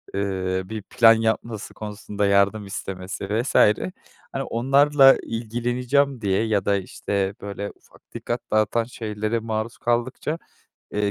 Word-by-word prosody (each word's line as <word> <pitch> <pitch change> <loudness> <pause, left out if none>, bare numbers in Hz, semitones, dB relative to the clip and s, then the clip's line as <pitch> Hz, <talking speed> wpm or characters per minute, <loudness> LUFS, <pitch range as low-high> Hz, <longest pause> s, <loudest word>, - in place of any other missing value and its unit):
eee, 95 -1 -1
bir 110 +2 -6
plan 115 +3 +6
yapması 110 -1 -2
konusunda 105 -1 -4
yardım 100 +1 +3
istemesi 95 -1 -6
vs. 115 +5 -1 0.8
hani, - - -2
onlarla 135 +3 +5
ilgileneceğim 120 +4 0
diye 100 0 +1
ya 100 -3 +1
da 100 - +3
işte 100 +1 -2
böyle, 100 0 -5
ufak - - -23
dikkat - - -3
dağıtan 110 +2 +2
şeylere 110 -1 -3
maruz 110 +1 -3
kaldıkça, 120 +6 -1 0.6
eee, 105 -1 0
110 Hz, 125 wpm, -23 LUFS, 100-120 Hz, 0.8 s, plan